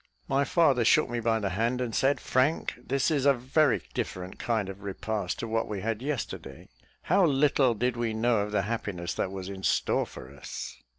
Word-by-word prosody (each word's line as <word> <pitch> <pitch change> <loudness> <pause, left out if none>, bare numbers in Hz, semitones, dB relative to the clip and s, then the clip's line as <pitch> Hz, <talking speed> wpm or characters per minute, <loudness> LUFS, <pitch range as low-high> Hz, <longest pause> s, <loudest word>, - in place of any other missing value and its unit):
My 135 +1 +2
father 140 -8 +3
shook 140 +4 +4
me 120 - -1
by 115 0 +1
the 100 -3 -2
hand, 115 +6 0
and 120 -3 -2
said, 135 +2 +2
"Frank, 130 +7 +1
this 135 +4 0
is 145 -2 +2
a 140 - +6
very 130 +3 +2
different 90 0 -4
kind 110 -4 0
of 95 +1 -8
repast 100 -1 -3
to 115 - -4
what 115 0 0
we 100 -3 -4
had 115 +1 -2
yesterday. 130 - -5 0.3
How 195 - +3
little 140 -5 +3
did 125 +3 0
we 120 -1 -1
know 115 0 +2
of 105 +1 -2
the 105 -2 +1
happiness 100 -5 -3
that 95 - -2
was 95 -1 -6
in 95 -1 -7
store - - +1
for 65 +2 -11
us!" 70 - -7
115 Hz, 200 wpm, -28 LUFS, 100-135 Hz, 0.3 s, a